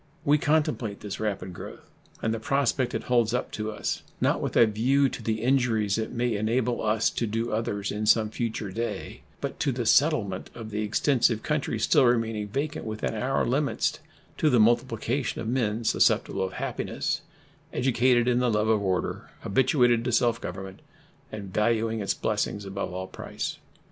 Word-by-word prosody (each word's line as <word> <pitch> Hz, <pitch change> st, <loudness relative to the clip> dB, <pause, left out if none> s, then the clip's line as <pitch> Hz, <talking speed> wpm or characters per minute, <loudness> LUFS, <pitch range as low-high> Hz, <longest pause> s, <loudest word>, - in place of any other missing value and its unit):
We 150 Hz, +1 st, +4 dB
contemplate 150 Hz, -9 st, 0 dB
this 105 Hz, -2 st, -6 dB
rapid 100 Hz, -4 st, -3 dB
growth -, -, -10 dB, 0.4 s
and 110 Hz, -, +1 dB
the 115 Hz, -, -3 dB
prospect 135 Hz, +1 st, 0 dB
it -, -, -2 dB
holds 120 Hz, -1 st, +2 dB
up -, -, -2 dB
to 110 Hz, 0 st, -3 dB
us, 105 Hz, -, -3 dB, 0.2 s
not -, -, +1 dB
with -, -, -3 dB
a 115 Hz, -, +8 dB
view 130 Hz, +6 st, +2 dB
to -, -, -7 dB
the 110 Hz, 0 st, -2 dB
injuries 120 Hz, -6 st, +2 dB
it 110 Hz, -, -3 dB
may 120 Hz, -1 st, 0 dB
enable 120 Hz, +3 st, 0 dB
us 110 Hz, 0 st, +2 dB
to 115 Hz, -, -2 dB
do 115 Hz, +2 st, -2 dB
others 105 Hz, -2 st, -2 dB
in 105 Hz, +1 st, -2 dB
some 110 Hz, -1 st, +4 dB
future 110 Hz, -4 st, -3 dB
day, 115 Hz, +5 st, -4 dB, 0.2 s
but -, -, -4 dB
to 140 Hz, -, +1 dB
the 120 Hz, -1 st, -3 dB
settlement 115 Hz, -, +2 dB
of 110 Hz, -2 st, -8 dB
the 105 Hz, +1 st, -2 dB
extensive 115 Hz, +1 st, +2 dB
country 150 Hz, -2 st, -1 dB
still -, -, +4 dB
remaining 115 Hz, -3 st, +1 dB
vacant 145 Hz, +8 st, -3 dB
within 110 Hz, 0 st, -3 dB
our 125 Hz, +5 st, 0 dB
limits 140 Hz, +3 st, 0 dB, 0.4 s
to 155 Hz, -, +4 dB
the 125 Hz, -, +4 dB
multiplication 120 Hz, +3 st, +1 dB
of 115 Hz, -, -4 dB
men 115 Hz, -2 st, 0 dB
susceptible 100 Hz, -2 st, +2 dB
of 95 Hz, -, -6 dB
happiness, -, -, -2 dB, 0.5 s
educated 120 Hz, -1 st, +2 dB
in 125 Hz, -1 st, +3 dB
the 125 Hz, -1 st, +2 dB
love 105 Hz, 0 st, +1 dB
of 110 Hz, -2 st, +3 dB
order, 95 Hz, -2 st, -2 dB
habituated 125 Hz, +1 st, +3 dB
to 125 Hz, -, 0 dB
self 115 Hz, 0 st, +2 dB
government, 95 Hz, +1 st, -7 dB, 0.5 s
and 100 Hz, -3 st, -7 dB
valuing 110 Hz, +1 st, +1 dB
its 100 Hz, -, -1 dB
blessings 105 Hz, -1 st, -1 dB
above 95 Hz, -1 st, -4 dB
all 95 Hz, +1 st, -4 dB
price. 95 Hz, -, -5 dB
115 Hz, 175 wpm, -27 LUFS, 105-125 Hz, 0.5 s, a